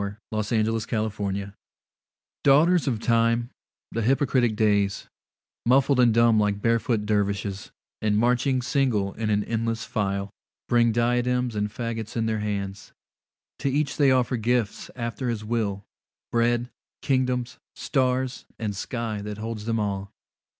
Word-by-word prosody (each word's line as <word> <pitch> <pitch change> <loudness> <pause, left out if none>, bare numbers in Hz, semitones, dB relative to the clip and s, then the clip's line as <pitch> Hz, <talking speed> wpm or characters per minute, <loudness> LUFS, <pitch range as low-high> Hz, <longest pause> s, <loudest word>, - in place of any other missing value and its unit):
Ralph 100 +1 -5
Waldo 110 +1 0
Emerson 110 -3 -2
Days 100 0 -4 0.9
DAUGHTERS 155 +4 +5
of 120 -5 0
Time, 115 +1 +2 0.4
the 115 - -2
hypocritic 125 -1 +2
Days, 100 -2 +1 0.6
Muffled 130 +2 +3
and 120 -2 +6
dumb 115 -1 +4
like 105 -1 +1
barefoot 115 -1 +1
dervishes, 100 -1 -1 0.3
And 105 -1 +2
marching 125 +3 +2
single 120 -7 +1
in 110 -1 -3
an 105 -1 +2
endless 115 0 -2
file, 100 -1 -2 0.4
Bring 120 -1 +4
diadems 125 +1 +1
and 105 0 -1
faggots 115 -1 -4
in 115 - +1
their 110 -1 0
hands. 100 -1 -4 0.7
To 140 - 0
each 140 0 0
they 140 -2 +5
offer 125 -1 +2
gifts 115 -1 -1
after 120 0 -3
his 110 -2 -3
will, 105 -3 -2 0.5
Bread, 120 +1 +1 0.3
kingdoms, 125 -1 0 0.2
stars, 130 -1 -1
and 105 -3 -3
sky 110 0 -3
that 105 0 -6
holds 110 -1 -5
them 115 -1 0
all. 100 -1 -2
115 Hz, 135 wpm, -25 LUFS, 105-125 Hz, 0.9 s, and